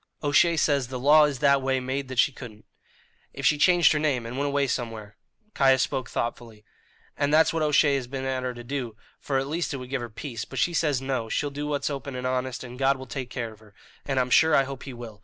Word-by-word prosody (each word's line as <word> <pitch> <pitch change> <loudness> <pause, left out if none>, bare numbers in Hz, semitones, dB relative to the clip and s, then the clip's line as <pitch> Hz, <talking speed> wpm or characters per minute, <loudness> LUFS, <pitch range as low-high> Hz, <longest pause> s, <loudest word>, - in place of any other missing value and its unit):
"O'Shea 160 +3 +3
says 140 -4 +1
the 130 +1 -5
law 150 +4 +6
is 145 -2 -2
that 140 +1 +3
way 130 0 0
made 130 +2 -3
that 130 -1 -7
she 130 - +4
couldn't." 115 -5 -11 0.7
"If 135 - -6
she 150 0 +3
changed 175 +3 +5
her 150 - 0
name 140 -6 0
and 115 +2 -6
went 140 +2 -1
away 140 0 +1
somewhere 115 -5 -4 0.2
" 215 -1 -41
Caius 135 -1 +4
spoke 130 -2 -3
thoughtfully. 115 -2 -5 0.5
"And 145 0 0
that's 160 +2 +4
what 165 - -1
O'Shea 150 -1 +3
has 125 -3 -5
been 135 +1 -5
at 130 -1 -1
her 125 -1 -4
to 120 - -9
do, 125 -3 -4 0.2
for 135 - -2
at 135 - 0
least 160 +1 -2
it - - -4
would 125 0 -9
give 135 -3 -1
her 120 - -6
peace; 115 0 -6
but 135 - -10
she 170 +7 +1
says, 145 -6 0
no, 130 -4 -2
she'll 145 +5 -1
do 145 +1 -4
what's 145 0 -1
open 140 -1 -6
and 125 0 -5
honest, 130 0 -2
and 125 0 -10
God 135 0 +3
will 130 - -9
take 130 0 -6
care 115 -3 -5
of 110 - -19
her. 105 -2 -20 0.3
And 135 -2 -1
I'm 125 0 -1
sure 160 +3 +5
I 135 - +5
hope 135 -1 -7
He 135 - -7
will. 115 -3 -10
135 Hz, 260 wpm, -26 LUFS, 125-145 Hz, 0.7 s, law